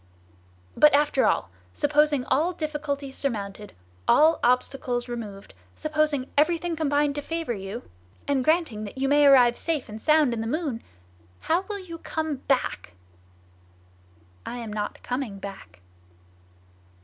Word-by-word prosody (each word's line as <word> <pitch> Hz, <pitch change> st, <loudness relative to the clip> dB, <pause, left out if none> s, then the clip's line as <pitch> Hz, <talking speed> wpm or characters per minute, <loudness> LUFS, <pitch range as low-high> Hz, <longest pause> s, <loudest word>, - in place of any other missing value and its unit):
"But 300 Hz, -1 st, +6 dB
after 290 Hz, -2 st, +3 dB
all, -, -, 0 dB, 0.2 s
supposing 295 Hz, -2 st, +2 dB
all 330 Hz, +6 st, +1 dB
difficulties 295 Hz, -4 st, -4 dB
surmounted, 210 Hz, -5 st, -4 dB, 0.3 s
all 315 Hz, +2 st, +5 dB
obstacles 250 Hz, 0 st, +1 dB
removed, 215 Hz, -5 st, -7 dB, 0.2 s
supposing 305 Hz, -3 st, 0 dB
everything 335 Hz, +3 st, +2 dB
combined 290 Hz, -2 st, +1 dB
to 290 Hz, -, -4 dB
favor 330 Hz, -4 st, -3 dB
you, 200 Hz, +3 st, -6 dB, 0.4 s
and 275 Hz, -2 st, +1 dB
granting 310 Hz, -8 st, +1 dB
that 205 Hz, -, -9 dB
you 270 Hz, +1 st, 0 dB
may 290 Hz, +1 st, +5 dB
arrive 245 Hz, -3 st, +6 dB
safe 320 Hz, -5 st, -2 dB
and 215 Hz, +1 st, -8 dB
sound 305 Hz, -3 st, +4 dB
in 225 Hz, -, -3 dB
the 225 Hz, -, -3 dB
moon, 280 Hz, -3 st, -2 dB, 0.6 s
how 350 Hz, +4 st, +1 dB
will 415 Hz, -, -2 dB
you 345 Hz, -4 st, -9 dB
come 315 Hz, -3 st, -3 dB
back?" 255 Hz, -, -1 dB, 1.5 s
"I 245 Hz, -, -6 dB
am 230 Hz, -3 st, -6 dB
not 210 Hz, -1 st, -4 dB
coming 250 Hz, -5 st, -3 dB
back!" 140 Hz, -, -10 dB
280 Hz, 135 wpm, -25 LUFS, 235-310 Hz, 1.5 s, But